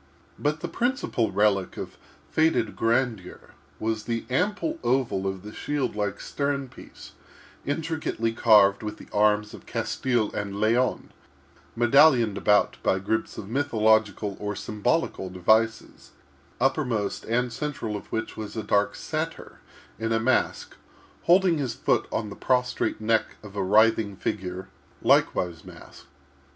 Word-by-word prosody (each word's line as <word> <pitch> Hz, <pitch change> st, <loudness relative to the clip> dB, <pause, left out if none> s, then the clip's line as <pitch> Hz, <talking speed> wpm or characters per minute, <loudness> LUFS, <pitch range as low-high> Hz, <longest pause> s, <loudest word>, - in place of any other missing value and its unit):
But 150 Hz, +1 st, -1 dB
the -, -, -3 dB
principal 240 Hz, -, -1 dB
relic 100 Hz, -1 st, +1 dB
of -, -, -6 dB, 0.4 s
faded 155 Hz, -8 st, +2 dB
grandeur 115 Hz, -5 st, -1 dB, 0.3 s
was 110 Hz, -1 st, -2 dB
the 115 Hz, -1 st, -2 dB
ample 210 Hz, -, 0 dB
oval 120 Hz, -7 st, 0 dB
of 95 Hz, -1 st, -4 dB
the 105 Hz, +1 st, -9 dB
shield 145 Hz, -6 st, -2 dB
like 105 Hz, -1 st, -2 dB
stern 140 Hz, -2 st, -2 dB
piece, -, -, -13 dB, 0.6 s
intricately 155 Hz, -7 st, -2 dB
carved 105 Hz, -4 st, +5 dB
with 105 Hz, -1 st, -5 dB
the -, -, -12 dB
arms 105 Hz, 0 st, +2 dB
of -, -, -12 dB
Castile 120 Hz, -5 st, -1 dB
and 100 Hz, -1 st, -4 dB
Leon, 115 Hz, +4 st, +1 dB, 0.6 s
medallioned 120 Hz, -2 st, +5 dB
about 105 Hz, 0 st, +2 dB
by 95 Hz, -, +2 dB
groups 110 Hz, +4 st, -2 dB
of 100 Hz, -, -7 dB
mythological 110 Hz, -5 st, +1 dB
or 105 Hz, 0 st, -3 dB
symbolical 105 Hz, -, -1 dB
devices; 110 Hz, +5 st, 0 dB, 0.5 s
uppermost 125 Hz, -6 st, 0 dB
and 120 Hz, +1 st, 0 dB
central 125 Hz, -6 st, -4 dB
of 105 Hz, -, -8 dB
which 110 Hz, 0 st, -3 dB
was 110 Hz, +1 st, -7 dB
a 110 Hz, -, -2 dB
dark 100 Hz, 0 st, +1 dB
satyr -, -, -5 dB, 0.4 s
in 115 Hz, 0 st, -2 dB
a 115 Hz, -, +2 dB
mask, 130 Hz, +3 st, 0 dB, 0.5 s
holding 175 Hz, -2 st, +4 dB
his 130 Hz, -4 st, -2 dB
foot -, -, +1 dB
on 105 Hz, -2 st, -2 dB
the -, -, -7 dB
prostrate 125 Hz, -3 st, 0 dB
neck 110 Hz, +1 st, 0 dB
of 105 Hz, -1 st, -11 dB
a 100 Hz, -, -1 dB
writhing 105 Hz, +1 st, +3 dB
figure, 95 Hz, -1 st, -4 dB, 0.4 s
likewise 85 Hz, -2 st, +2 dB
masked. -, -, -14 dB
110 Hz, 135 wpm, -26 LUFS, 105-130 Hz, 0.6 s, carved